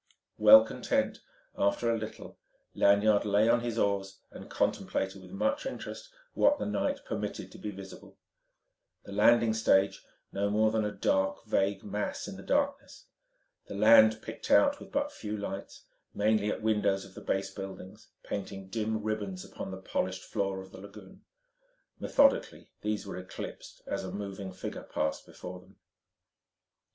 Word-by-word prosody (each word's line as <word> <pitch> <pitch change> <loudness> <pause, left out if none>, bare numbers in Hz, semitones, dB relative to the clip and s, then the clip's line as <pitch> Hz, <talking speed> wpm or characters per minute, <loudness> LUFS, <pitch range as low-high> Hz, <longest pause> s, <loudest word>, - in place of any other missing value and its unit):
Well 110 +1 +9
content, - - -1 0.4
after 110 +4 +1
a - - +2
little, 110 0 -8 0.3
Lanyard 100 +1 +4
lay 105 +1 +3
on 120 +1 +4
his 120 -1 -3
oars 100 -2 0
and - - -11
contemplated 95 0 -1
with - - -13
much 275 - -1
interest - - -7 0.2
what 290 +1 +4
the - - -3
night 275 +7 -1
permitted 105 -2 -4
to - - -12
be 105 - -4
visible: 95 -1 -11 0.9
the - - -11
landing 115 +2 +4
stage, 100 -3 +2 0.3
no 100 +1 0
more 110 +1 +3
than 110 -1 +1
a 105 - -1
dark, 95 +1 0
vague 100 -2 0
mass 105 +1 -3
in - - -7
the - - -9
darkness; - - -1 0.6
the - - -7
land 110 +1 +6
picked - - -7
out 285 0 +5
with - - -12
but 285 +1 0
few 105 - -5
lights, 100 -1 -6 0.3
mainly 105 0 +2
at 105 - -3
windows 105 -3 +1
of - - -15
the - - -10
base 95 0 -2
buildings, 95 -1 -9 0.2
painting 95 -1 -6
dim 110 0 -2
ribbons 100 -4 -3
upon 95 0 -7
the 95 - -6
polished 95 0 -3
floor 95 -1 -2
of 95 - -15
the 95 - -11
lagoon. 100 -1 -13 0.8
Methodically 275 -1 +2
these 105 0 -2
were 100 - -6
eclipsed 90 0 -8
as - - -3
a 95 - -5
moving 100 -1 -5
figure 90 - -6
passed 80 - -3
before 90 0 -9
them. 90 - -20
105 Hz, 160 wpm, -30 LUFS, 95-110 Hz, 0.9 s, Well